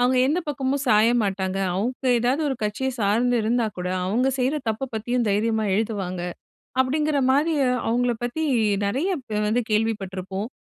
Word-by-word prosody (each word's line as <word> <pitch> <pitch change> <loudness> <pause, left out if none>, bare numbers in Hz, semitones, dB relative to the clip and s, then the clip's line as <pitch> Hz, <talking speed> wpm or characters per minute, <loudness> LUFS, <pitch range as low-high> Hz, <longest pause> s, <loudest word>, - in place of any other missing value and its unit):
அவுங்க 250 +1 +3
எந்த 300 +6 +1
பக்கமும் 275 0 -1
சாய 215 +1 +5
மாட்டாங்க. 190 -1 -1 0.2
அவுங்க 250 +7 -2
எதாவது 250 +6 +1
ஒரு 270 - 0
கட்சிய 210 +6 -1
சார்ந்து 235 +4 +2
இருந்தாக்கூட, 215 -5 -1 0.2
அவுங்க 240 +7 +1
செய்ற 260 +3 +1
தப்ப 220 +5 -2
பத்தியும் 240 +2 -1
தைரியமா 220 +2 +1
எழுதுவாங்க. 200 -4 -2 0.6
அப்பிடிங்கிறமாரி 285 +2 +2 0.3
அவுங்கள 245 +1 +2
பத்தி 245 +7 -2 0.4
நிறைய 265 - 0
இப்ப 220 -5 -4
வந்து 240 +3 +2
கேள்வி 225 +1 +2
பட்ருப்போம். 190 +2 -5
235 Hz, 140 wpm, -24 LUFS, 210-260 Hz, 0.6 s, சாய